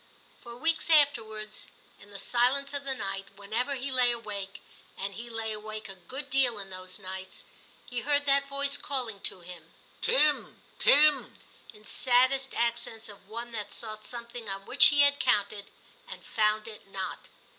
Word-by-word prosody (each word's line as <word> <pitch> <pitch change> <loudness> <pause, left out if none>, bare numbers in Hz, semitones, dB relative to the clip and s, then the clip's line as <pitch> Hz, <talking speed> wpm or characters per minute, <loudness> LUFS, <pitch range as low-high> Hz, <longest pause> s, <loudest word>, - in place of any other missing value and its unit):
For 235 -1 -10
weeks 325 +5 0
afterwards, 220 -9 +2 0.3
in 205 - -16
the 200 - -9
silence 260 +6 +1
of 285 -1 -4
the 270 -1 -2
night, 195 -4 -4
whenever 225 +8 -2
he 265 +1 -4
lay 250 -1 +4
awake 200 -4 -5 0.4
(and 195 +1 -4
he 235 +5 -8
lay 225 -1 -3
awake 215 0 -7
a - - -7
good 260 +10 -8
deal 260 -4 +3
in 195 -1 -8
those 185 0 -3
nights), 190 -1 -8 0.4
he 245 - -4
heard 290 +2 +1
that 280 0 +3
voice 280 0 +1
calling 245 -7 -1
to 185 - 0
him, 170 -2 -11 0.3
*Tim, 305 -12 +2 0.2
Tim!' 300 +1 +5 0.3
in 215 -2 -18
saddest 260 +2 +2
accents 235 -1 -1
of 200 -1 -15
one 235 +2 -6
that 210 -3 -5
sought 215 -2 -3
something 235 -1 -6
on 195 0 -5
which - - +8
he 290 0 +5
had 285 0 +5
counted, 205 0 0 0.4
and - - -10
found 215 0 +1
it 215 -3 -11
not. 195 -1 -5
230 Hz, 165 wpm, -29 LUFS, 205-270 Hz, 0.4 s, which